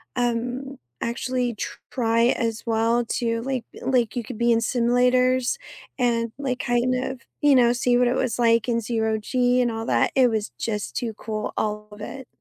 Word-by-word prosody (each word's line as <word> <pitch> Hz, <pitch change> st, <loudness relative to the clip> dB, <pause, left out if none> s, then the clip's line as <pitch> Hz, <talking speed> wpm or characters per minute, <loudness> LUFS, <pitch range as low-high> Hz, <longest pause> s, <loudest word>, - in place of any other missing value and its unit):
um, 245 Hz, +2 st, -2 dB, 0.2 s
actually 245 Hz, 0 st, -1 dB, 0.4 s
try 230 Hz, -2 st, +2 dB
as 230 Hz, -3 st, -1 dB
well 230 Hz, +1 st, +1 dB
to 230 Hz, -1 st, -1 dB
like 260 Hz, -2 st, -2 dB, 0.2 s
like, 245 Hz, -4 st, +1 dB
you 245 Hz, -, -2 dB
could 225 Hz, +1 st, -8 dB
be 235 Hz, +1 st, +3 dB
in 230 Hz, -, +4 dB
simulators 250 Hz, -, +2 dB, 0.4 s
and, 230 Hz, -2 st, +1 dB
like, 260 Hz, -3 st, -2 dB
kind 240 Hz, +1 st, +1 dB
of, 255 Hz, -1 st, -3 dB, 0.2 s
you 290 Hz, -2 st, +5 dB
know, 240 Hz, -2 st, +5 dB
see 245 Hz, 0 st, +2 dB
what 245 Hz, 0 st, +3 dB
it 245 Hz, -, +1 dB
was 255 Hz, -3 st, -1 dB
like 230 Hz, -1 st, +3 dB
in 235 Hz, -1 st, +1 dB
zero 220 Hz, -1 st, 0 dB
G 250 Hz, +3 st, +2 dB
and 240 Hz, -1 st, +1 dB
all 225 Hz, 0 st, -4 dB
that. -, -, +2 dB
It 255 Hz, -2 st, +5 dB
was 220 Hz, -2 st, -1 dB
just 210 Hz, -2 st, -3 dB
too 230 Hz, -2 st, -2 dB
cool. 215 Hz, 0 st, -4 dB
All 210 Hz, 0 st, -2 dB
of 210 Hz, 0 st, -12 dB
it. 265 Hz, +4 st, -7 dB
240 Hz, 185 wpm, -24 LUFS, 230-250 Hz, 0.4 s, you